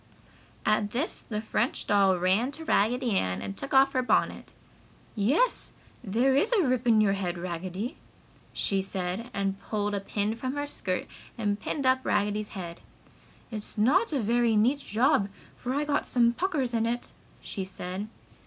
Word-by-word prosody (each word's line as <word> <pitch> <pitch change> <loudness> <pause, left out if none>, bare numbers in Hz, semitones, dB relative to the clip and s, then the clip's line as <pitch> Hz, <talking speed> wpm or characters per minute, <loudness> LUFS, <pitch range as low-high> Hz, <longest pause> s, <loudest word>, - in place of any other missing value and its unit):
At 215 -1 +2
this 255 +10 -2
the 210 -2 -4
French 230 +3 -1
doll 195 -2 +4
ran 190 +8 +2
to 320 +2 -7
Raggedy 245 0 +2
Ann 90 - 0
and 100 0 -5
took 95 - -6
off 270 0 +5
her 255 - +2
bonnet. 250 - 0 0.6
"Yes, 275 - +1 0.3
there 245 +6 +2
is 295 - +3
a 410 -6 +4
rip 250 -1 0
in 220 -2 +6
your 200 -2 +3
head, 185 -3 -2
Raggedy!" 185 - -4 0.5
she 195 -1 0
said 190 +4 -3
and 195 -2 -2
pulled 205 -1 -2
a 200 - 0
pin 205 +2 -1
from 255 +3 -4
her 290 0 -1
skirt 185 -10 -3 0.3
and 205 -2 0
pinned 275 +5 -3
up 260 0 +4
Raggedy's 210 0 0
head. 170 -2 -6 0.7
"It's 215 0 -6
not 295 - +3
a 285 - +1
very 235 0 +2
neat 245 +7 +3
job, 215 -4 +2 0.3
for 250 - -4
I 295 +1 0
got 290 -1 0
some 235 -1 +3
puckers 285 -6 -1
in 230 0 +1
it!" 240 +1 -3 0.3
she 195 - -5
said. 190 +1 -5
220 Hz, 170 wpm, -28 LUFS, 195-255 Hz, 0.7 s, in